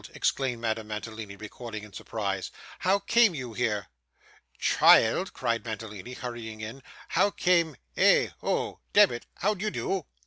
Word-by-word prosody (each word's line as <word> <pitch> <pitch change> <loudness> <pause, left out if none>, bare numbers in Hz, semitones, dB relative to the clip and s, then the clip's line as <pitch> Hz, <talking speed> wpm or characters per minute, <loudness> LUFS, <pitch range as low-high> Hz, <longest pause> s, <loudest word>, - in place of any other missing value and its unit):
exclaimed 130 -3 0
Madame 110 -1 -2
Mantalini, 105 -1 -6
recoiling 110 +1 -8
in 105 -2 -12
surprise. 100 -4 -3 0.3
'How 190 +2 +3
came 220 -1 +4
you 125 -5 -5
here?' 105 -3 -1 0.7
'Child!' 175 +12 +5
cried 115 -2 -1
Mantalini, 110 0 -6
hurrying 120 -4 -6
in. 110 +5 -7 0.3
'How 205 - +3
came 170 -6 +2 0.2
eh! - - +5
oh - - -1
demmit, 120 -1 +4
how 210 +3 +3
d'ye 210 +2 -2
do? 190 -5 -2
120 Hz, 135 wpm, -28 LUFS, 110-160 Hz, 0.7 s, Child